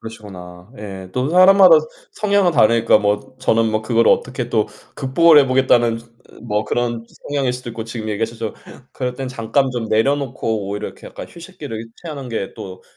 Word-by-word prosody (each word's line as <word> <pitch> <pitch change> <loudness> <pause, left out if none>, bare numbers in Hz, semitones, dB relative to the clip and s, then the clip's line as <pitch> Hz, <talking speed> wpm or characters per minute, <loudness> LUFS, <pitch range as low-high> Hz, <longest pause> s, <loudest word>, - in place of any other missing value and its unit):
그러시구나. 95 -4 -11
예 95 -3 -8
또 125 +3 -1
사람마다 185 -1 +7 0.4
성향은 200 -3 +2
다르니까 115 -3 +4
뭐 105 +4 -2
저는 115 -3 +1
뭐 110 0 0
그거를 115 0 +3
어떻게 - - -1
또 - - +1 0.3
극복을 155 +4 +5
해 140 - +5
보겠다는 120 -3 +2 0.4
뭐 105 -2 -2
그런 115 +1 -2 0.2
성향일 140 -3 0
수도 125 -1 -7
있고 110 -1 -6
지금 110 -1 -6
얘기하셨지만 115 +1 -3 0.4
그럴 125 -1 -4
땐 130 0 -5
잠깐 130 +3 0
좀 120 -2 -4
내려놓고 115 -4 -1
오히려 105 +1 -4
약간 - - -16 0.2
이렇게 - - -17
휴식기를 150 -10 -8 0.2
취하는 145 -6 -7
게 110 -4 -4
또 95 -1 -10
115 Hz, 380 characters per minute, -19 LUFS, 110-135 Hz, 0.4 s, 사람마다